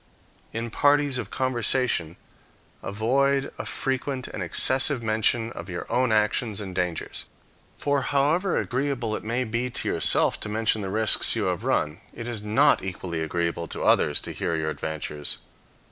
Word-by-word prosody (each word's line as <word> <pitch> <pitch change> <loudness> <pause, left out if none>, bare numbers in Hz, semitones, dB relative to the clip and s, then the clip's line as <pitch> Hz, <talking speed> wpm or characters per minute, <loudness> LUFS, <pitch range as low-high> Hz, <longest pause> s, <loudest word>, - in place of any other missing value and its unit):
In 115 0 -4
parties 145 0 +3
of 110 -5 -5
conversation, 125 -9 +1 0.7
avoid 135 +6 +1
a - - -4
frequent 135 0 -2
and 100 - -6
excessive 130 - +1
mention 110 +1 +1
of 85 -4 -8
your 85 - -5
own 125 -2 +2
actions 110 0 +1
and 95 -3 -6
dangers. 90 -2 -3 0.5
For, 145 -1 0
however 150 +8 +1
agreeable 125 -4 -1
it - - -6
may 120 +4 -1
be 120 +2 -2
to - - -4
yourself - - +4
to - - -4
mention 110 0 0
the 95 - -4
risks 110 +2 +4
you - - 0
have - - -1
run, 75 +6 0
it 115 0 -6
is 115 -4 -5
not 135 +4 +3
equally 90 -3 -4
agreeable 85 +1 -2
to - - -5
others - - +3
to - - -6
hear 85 - -2
your 80 -1 -1
adventures. 75 -2 -3
115 Hz, 160 wpm, -25 LUFS, 95-130 Hz, 0.7 s, yourself